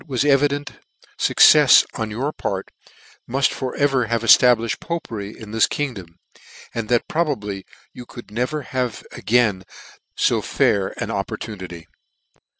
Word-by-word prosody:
was 130 -1 -1
evident, 145 0 +1 0.5
fuccefs - - +6
on 110 -1 -4
your 130 +8 -3
part 95 -1 -4 0.6
muft 135 +2 +2
for 130 -1 -5
ever 135 -4 +1
have 115 0 -1
eftabh'fhed 115 -1 +4
Popery 110 -12 -6
in 110 -2 -10
this 110 0 +3
kingdom, 100 - -5 0.6
and 115 -2 -4
that 120 -1 +1
probably 105 - -3 0.3
you 125 - -11
could 120 -5 -12
never 125 +7 -2
have 125 -3 -4
again 110 -5 +1 0.5
fo - - +2
fair 95 -2 0
an - - -4
opportunity. 90 -6 -6
115 Hz, 130 wpm, -21 LUFS, 105-135 Hz, 0.6 s, fuccefs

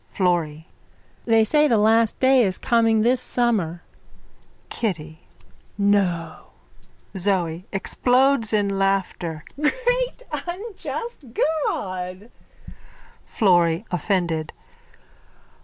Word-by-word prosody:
_ - - -28
FLORRY: 165 -4 0 0.6
They 225 -1 +4
say 300 +7 +3
the 235 -5 +3
last 220 +1 +3
day 260 0 +5
is 190 -3 -1
coming 225 -2 +2
this 245 +3 +2
summer. 210 -10 0 0.9
KITTY: 160 -8 -4 0.6
No! 185 -5 0 0.6
ZOE: 180 -3 0
(Explodes 250 +3 +2
in 200 -2 0
laughter.) 190 -5 -1 0.2
Great - - 0 0.2
unjust 425 +2 -6 0.5
God! 185 +3 -5 0.9
FLORRY: 175 -2 +2
_(Offended.) 170 -3 -1
200 Hz, 85 wpm, -22 LUFS, 175-240 Hz, 0.9 s, day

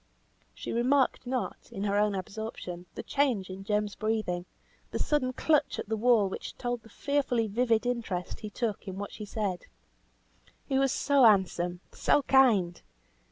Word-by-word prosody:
She - - -6
remarked 255 +2 +2
not, 255 0 -3
in 195 - -4
her 200 -1 0
own 205 0 +2
absorption, 185 -3 -6
the - - -5
change 245 -10 0
in 190 +1 -7
Jem's 210 0 0
breathing, 215 -5 -1 0.4
the - - -3
sudden 285 -4 +1
clutch 300 +3 +1
at - - -5
the 220 - +1
wall 220 -2 +4
which 190 - -6
told 245 -1 -2
the 225 - -17
fearfully 270 -2 0
vivid 230 +1 +1
interest 225 -8 -2
he 215 - -6
took 215 -2 -3
in 190 0 -5
what 205 0 -5
she 210 - -7
said. 200 -4 -3 1.0
"He 265 -1 +1
was 270 -1 +3
so 280 -2 +3
handsome, 180 -4 +3
so 290 - +2
kind! 220 -12 +4
220 Hz, 160 wpm, -29 LUFS, 195-250 Hz, 1.0 s, wall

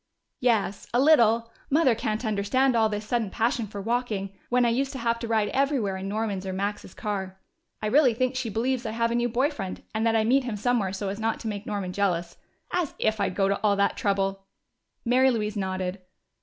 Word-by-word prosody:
"Yes, 220 -5 +1
a - - +4
little. 235 -6 +4 0.2
Mother 290 -3 +4
can't 220 +1 -2
understand 220 +5 +2
all 220 -1 +3
this 210 0 -4
sudden 225 -2 0
passion 230 +1 0
for 205 0 -7
walking, 215 -3 -2 0.2
when 245 0 +3
I - - +4
used 265 +4 0
to - - -5
have 230 -1 0
to 230 - -4
ride 220 -2 +1
everywhere 265 -8 +1
in 190 +1 -5
Norman's 205 -2 -2
or 190 -1 -4
Max's 200 -1 -4
car. 190 -2 -4 0.4
I - - 0
really 250 +1 +4
think 255 +2 0
she 255 -3 -2
believes 245 +4 -1
I 220 -2 -4
have 230 0 +1
a - - 0
new 240 0 +1
boy 260 +6 +1
friend 195 -11 -6
and 220 0 -1
that 225 - +2
I 220 - +3
meet 260 +5 +3
him 235 -4 -3
somewhere 215 -3 +1
so 195 +1 -3
as 200 +2 -5
not 225 0 -1
to 225 - -5
make 205 -1 -4
Norman 200 -3 -3
jealous. 175 -4 0 0.4
As 350 -5 -1
if 220 0 0
I'd 180 - 0
go 195 -1 +2
to 200 0 0
all 205 -2 +3
that 200 0 +1
trouble!" 195 -1 -1 0.6
Mary 255 +2 +4
Louise 215 -3 -1
nodded. 185 -1 -3
220 Hz, 220 wpm, -26 LUFS, 200-245 Hz, 0.6 s, a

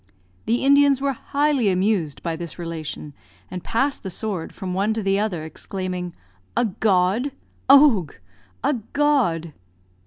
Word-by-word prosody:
The 235 +3 +1
Indians 280 -1 +5
were 280 0 0
highly 280 -3 +1
amused 185 -5 0
by 165 -1 -2
this 170 0 -7
relation, 160 -3 -6 0.4
and 180 - -6
passed 270 +5 0
the 195 - -5
sword 190 -3 -4
from 185 -1 -5
one 200 +4 0
to 220 - -2
the 195 0 +2
other, 195 -7 -2
exclaiming, 180 +1 -5 0.4
"A - - +3
god! 205 +5 +1 0.4
Owgh! 270 - +6 0.5
A 290 - +2 0.2
god!" 240 - +1
195 Hz, 135 wpm, -23 LUFS, 175-270 Hz, 0.5 s, Owgh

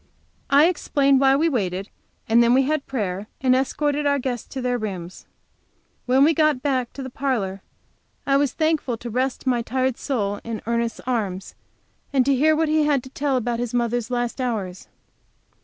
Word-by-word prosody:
I 285 +2 +6
explained 280 -5 +2
why 270 0 +5
we 310 +4 +2
waited, 195 - -2 0.4
and 230 +1 +5
then 235 +1 +4
we 270 - +4
had 300 +1 -1
prayer 205 -5 -3
and 255 -1 +3
escorted 290 +2 0
our 280 0 +3
guests 250 -3 -3
to 270 - -6
their 250 -1 -1
rooms. 185 -5 -6 0.8
When 260 +2 +4
we 320 +3 +5
got 305 -4 +2
back 260 -4 0
to 275 - -7
the 260 - -6
parlor 215 -9 -2 0.6
I 275 - +2
was 280 -2 +1
thankful 310 -7 0
to 235 +1 -7
rest 255 +3 -1
my 250 -2 +1
tired 255 +1 -1
soul 205 -7 -2
in 230 -2 -4
Ernest's 235 0 -1
arms, 205 -7 -2 0.6
and 265 -3 +3
to 275 - +3
hear 310 +4 +3
what 315 - 0
little 310 0 +2
he 300 - +2
had 280 -4 +2
to 260 - -11
tell 275 -1 0
about 240 -1 -2
his 245 0 -3
mother's 240 -1 0
last 245 +1 -2
hours. 200 -7 -3
255 Hz, 190 wpm, -23 LUFS, 230-275 Hz, 0.8 s, I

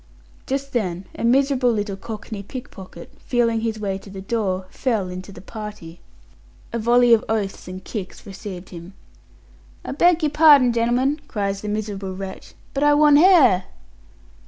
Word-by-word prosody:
Just 275 0 -3
then 190 -6 -2
a - - -7
miserable 260 +1 +3
little 205 -3 -2
cockney 215 +1 -7
pickpocket, 200 -3 -10
feeling 230 -2 0
his 220 -1 -2
way 195 -2 -3
to 195 - -14
the 195 0 -8
door, 190 -2 -2
fell 220 -8 -1
into 185 +2 -8
the 180 - -12
party. 210 -7 -9 0.7
A 235 - -1
volley 240 +1 +4
of 225 - +4
oaths 210 -5 -2
and 185 +1 -8
kicks 200 -5 -7
received 190 -2 -8
him. 175 +2 -11 0.9
"I - - -4
beg 345 +3 +3
your 300 - +1
pardon, 290 -5 +6
gen'l'men," 245 +5 +1
cries 200 -2 -2
the 210 - -6
miserable 200 -3 -4
wretch, 190 0 -8 0.2
"but 275 - -1
I 295 0 +5
want 295 -1 +6
h'air." 300 - +5
220 Hz, 160 wpm, -22 LUFS, 195-255 Hz, 0.9 s, pardon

